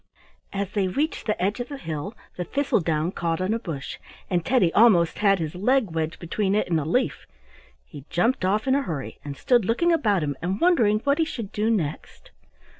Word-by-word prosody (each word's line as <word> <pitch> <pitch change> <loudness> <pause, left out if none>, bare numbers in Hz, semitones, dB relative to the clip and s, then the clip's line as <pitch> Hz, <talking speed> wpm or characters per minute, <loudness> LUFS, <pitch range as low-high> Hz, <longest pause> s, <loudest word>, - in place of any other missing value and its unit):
As 200 0 -3
they 200 -3 0
reached 285 - -2
the 210 - 0
edge 200 +6 0
of 245 - -4
the 285 - -6
hill 165 - -5 0.2
the 180 - -3
thistle 280 +5 0
down 160 0 0
caught 165 -3 -2
on 185 +3 0
a 230 - -1
bush, 160 - -6 0.3
and 175 -2 +1
Teddy 230 -9 +2
almost 195 -7 +4
has 200 -2 +4
his 160 -3 -4
leg 220 +2 +1
wedged 160 0 -2
between 195 +3 -1
it 215 - +1
and 165 -3 +1
a 145 - -3
leaf. 250 +11 -1 0.6
He 135 - -12
jumped 230 +6 +1
off 205 +4 +1
in 260 - +3
a 280 - +2
hurry, 155 - -5
and 140 -1 -7
stood 245 -3 +3
looking 240 - +2
about 210 - +2
him 145 -1 -2
and 185 +4 -2
wondering 230 -12 +3
what 280 +2 +2
he - - +4
should 230 -10 -6
do 215 +2 0
next. 165 -10 -3
200 Hz, 210 wpm, -24 LUFS, 165-235 Hz, 0.6 s, almost